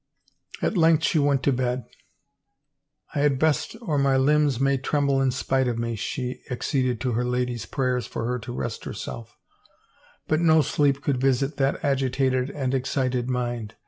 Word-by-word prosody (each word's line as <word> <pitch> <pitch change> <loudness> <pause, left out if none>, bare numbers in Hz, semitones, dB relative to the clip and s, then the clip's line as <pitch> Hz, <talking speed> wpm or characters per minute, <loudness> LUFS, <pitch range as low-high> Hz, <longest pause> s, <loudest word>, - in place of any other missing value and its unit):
At - - +1
length 160 -1 +4
she 160 - +2
went 140 -2 +2
to 140 - +3
bed. 125 -1 -1 0.6
" - - -34
I - - -1
had 145 -2 +3
best 155 - +1
or 155 -9 0
my 135 -1 +3
limbs 145 -1 +3
may 135 0 +2
tremble 140 0 +1
in 135 - +3
spite 130 0 0
of 120 -2 -1
me,*' 115 0 -2
she 125 +4 -4
acceded 125 -1 -1
to 125 0 0
her 120 +1 0
ladies' 125 -2 -2
prayers 125 -2 -1
for - - -4
her 125 +1 -1
to 115 +2 -8
rest 120 -2 -4
herself, 115 +2 -7 0.9
but 155 - +2
no 160 -2 +5
sleep 140 -1 +1
could 130 -3 0
visit 135 +2 +1
that 135 0 0
agitated 130 -1 +1
and 135 -3 -2
excited 130 -1 -1
mind. 120 -3 -3
130 Hz, 175 wpm, -25 LUFS, 125-140 Hz, 0.9 s, no